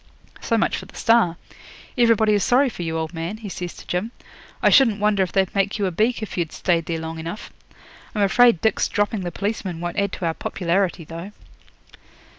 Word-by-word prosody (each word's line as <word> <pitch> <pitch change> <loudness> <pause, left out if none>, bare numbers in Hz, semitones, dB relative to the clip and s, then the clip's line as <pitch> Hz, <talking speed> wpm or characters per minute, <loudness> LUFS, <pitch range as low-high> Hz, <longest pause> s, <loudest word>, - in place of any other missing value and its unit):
So 230 - +1
much 225 - +1
for - - -8
the - - -17
"Star". 225 -8 +3 0.6
Everybody 230 -3 +4
is 205 -2 +2
sorry 260 +2 +3
for 205 - -8
you, 165 -1 -2
old 160 +1 -3
man,' 170 +5 -4
he 215 -2 -8
says 180 -1 -6
to - - -12
Jim. 180 +5 -2 0.5
'I - - +5
shouldn't 230 -7 +5
wonder 210 -1 +2
if 185 - 0
they'd 190 -2 +1
make 200 +1 0
you 205 - 0
a 185 - 0
beak 220 +5 0
if 205 - -5
you'd 165 -3 -2
stayed 170 -3 0
there 165 - -1
long 160 0 -6
enough. 165 +6 -7 0.6
I'm 210 - +2
afraid 230 -1 +5
Dick's 220 -2 +2
dropping 205 0 -1
the 175 -1 -4
policeman 195 -2 -3
won't 175 +2 -3
add 200 -1 0
to 180 - -4
our 165 - +1
popularity, 180 +1 -1
though.' 165 +6 -8
195 Hz, 210 wpm, -22 LUFS, 170-215 Hz, 0.6 s, I